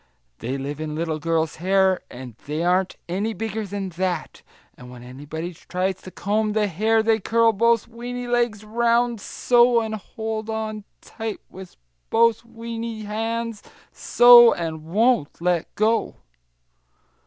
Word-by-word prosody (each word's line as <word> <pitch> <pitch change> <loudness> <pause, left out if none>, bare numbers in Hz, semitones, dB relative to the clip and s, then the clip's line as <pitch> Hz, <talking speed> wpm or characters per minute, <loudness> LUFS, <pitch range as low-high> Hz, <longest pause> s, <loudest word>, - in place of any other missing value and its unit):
They 125 +4 -3
live 140 +2 -5
in 155 -1 -4
little 160 -1 -2
girls' 160 0 -1
hair, 190 +2 +2
and 125 -1 -9
they 155 +3 -2
aren't 180 +1 +1
any 200 +6 -2
bigger 220 -1 -4
than 195 -1 -4
that, 180 -1 -3 0.3
and 125 - -13
when 125 -1 -11
anybody 145 +7 -7
tries 185 +3 -3
to - - -10
comb 210 +3 -1
the 215 -1 +2
hair 220 +4 +1
they 220 0 +2
curl 230 +2 +2
both 230 +1 +2
weeny 245 +1 -6
legs 240 -3 0
round, 235 +1 +1
so, 240 +2 +3
and 220 -1 -3
hold 220 +1 -5
on 215 -1 -4 0.2
tight 220 -2 -6
with 190 0 -11 0.3
both 230 0 +3
weeny 230 -1 -6
hands, 225 +1 -3 0.3
so, 240 -1 +7
and 160 -2 -5
won't 215 - +1
let 175 -1 0
go!" 220 +2 +1
215 Hz, 145 wpm, -23 LUFS, 175-230 Hz, 0.3 s, so